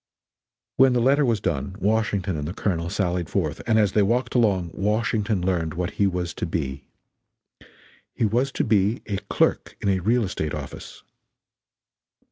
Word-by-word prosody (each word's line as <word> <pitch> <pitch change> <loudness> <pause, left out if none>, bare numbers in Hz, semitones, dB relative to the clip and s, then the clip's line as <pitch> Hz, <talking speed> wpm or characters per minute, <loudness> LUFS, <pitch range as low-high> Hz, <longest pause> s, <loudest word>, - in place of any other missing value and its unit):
When 130 -1 +6
the 125 - +2
letter 135 +5 +4
was 115 -5 +1
done, 95 0 -2
Washington 105 -3 0
and 75 -1 -3
the 90 - -5
Colonel 85 -6 -1
sallied 90 -3 -1
forth, 80 -7 -1
and 110 -1 +3
as 105 -3 +3
they 105 - +3
walked 120 +6 +1
along 100 -8 +2
Washington 105 -1 0
learned 85 -4 -1
what 90 +2 -2
he 100 - +5
was 90 -2 -2
to - - -4
be. 70 -5 -3 1.3
He - - +1
was 120 +6 +1
to - - 0
be 105 +2 +1
a 100 -2 -2
clerk - - +1
in 100 - -1
a 95 -1 +2
real 115 +6 +2
estate 80 -6 -3
office. - - -8
100 Hz, 165 wpm, -24 LUFS, 90-110 Hz, 1.3 s, When